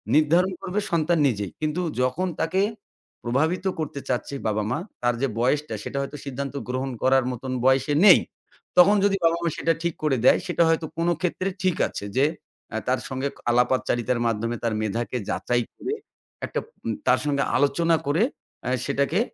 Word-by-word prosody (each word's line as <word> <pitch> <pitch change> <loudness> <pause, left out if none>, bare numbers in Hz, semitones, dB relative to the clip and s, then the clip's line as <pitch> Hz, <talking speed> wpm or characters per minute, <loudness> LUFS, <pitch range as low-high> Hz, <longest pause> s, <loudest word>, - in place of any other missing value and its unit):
নির্ধারণ 170 +5 +4
করবে 195 +3 -2
সন্তান 170 +1 +2
নিজেই। 105 -6 -2
কিন্তু 155 +4 -1 0.2
যখন 130 +9 0
তাকে 185 +4 +1 0.6
প্রভাবিত 155 +10 0
করতে 145 -2 -3
চাচ্ছে 130 +2 -2
বাবা-মা 110 +5 0 0.2
তার 120 0 +2
যে 135 - +2
বয়সটা 130 -1 +1
সেটা 140 - -5
হয়তো 145 +2 -5
সিদ্ধান্ত 140 +1 -4 0.2
গ্রহণ 130 +1 -2
করার 130 0 +4
মত 125 +1 -7 0.2
বয়সে 135 +3 +3
নেই। 190 - +9 0.6
তখন 195 +4 +8
যদি 195 -1 +3
বাবা-মা 170 0 +2
সেটা 165 - +2
ঠিক 170 -2 0
করে 135 -4 +2
দেয় - - +6
সেটা 170 -1 +2
হয়তো 165 0 +1
কোন 170 +1 0
ক্ষেত্রে 185 +2 -1
ঠিক 185 -3 +2
আছে 100 - -6
যে 135 - +5 0.6
তার 130 0 +2
সঙ্গে 130 +1 -2 0.2
আলাপচারিতার 125 0 +1
মাধ্যমে 115 +1 -1
তার 115 -2 0
মেধাকে 115 +4 -2
যাচাই 120 0 0
করে 405 - -4 0.5
একটা - - -2 0.5
তার - - +5
সঙ্গে 140 -2 +1
আলোচনা 155 +5 +3
করে 160 +9 +3 0.6
সেটাকে 140 +9 +1
140 Hz, 155 wpm, -24 LUFS, 125-170 Hz, 0.6 s, নেই